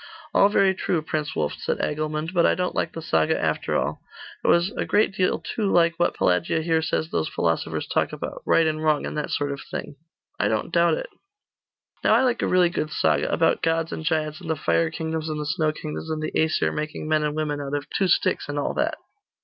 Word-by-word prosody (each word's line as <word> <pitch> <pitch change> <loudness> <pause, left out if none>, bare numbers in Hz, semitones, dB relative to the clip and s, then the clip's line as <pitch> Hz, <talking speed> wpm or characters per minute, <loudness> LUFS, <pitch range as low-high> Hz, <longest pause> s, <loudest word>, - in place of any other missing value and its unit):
'All 200 - +5
very 195 -2 +3
true, 175 -3 -1
Prince 155 -1 -3
Wulf,' 75 -2 -1
said - - -1
Agilmund, 155 +2 -2
'but 175 -2 +3
I - - +4
don't 180 0 -1
like 160 - -1
the 165 - -6
saga 80 - +2
after - - 0
all. - - -2 0.4
It - - -1
was 170 +3 +4
a - - -2
great 205 -1 +2
deal 185 -1 +1
too 210 -3 -2
like 170 -1 +4
what 175 - +2
Pelagia 90 - +1
here 160 -1 +2
says 160 0 -1
those 80 - 0
philosophers - - -1
talk - - 0
about - - -6
right 165 - +4
and 155 0 -1
wrong, 155 -2 +2
and - - -5
that 150 -1 -2
sort 145 0 -1
of 140 - -5
thing.' 140 - -6 0.4
'I - - +2
don't - - -1
doubt - - +4
it.' - - -6 0.9
'Now 215 - +5
I 240 - +4
like 245 -2 +1
a - - +1
really 180 -1 +4
good 155 - -2
saga, 80 - +1
about - - +2
gods 165 0 0
and - - -5
giants, 155 +1 -1
and 165 - -8
the 160 - +1
fire 165 +2 +1
kingdoms 160 0 -3
and 155 -1 -3
the 150 - -3
snow 155 0 +1
kingdoms, 155 +1 -6
and 155 -1 -2
the 155 - -4
Aesir 160 0 +2
making 155 0 -4
men 155 0 +2
and 150 0 -1
women 150 -2 -2
out 140 0 -3
of 140 -1 -4
two 195 - +1
sticks, 175 - +1
and 145 - -3
all 145 - -1
that. - - -1
155 Hz, 230 wpm, -24 LUFS, 150-170 Hz, 0.9 s, All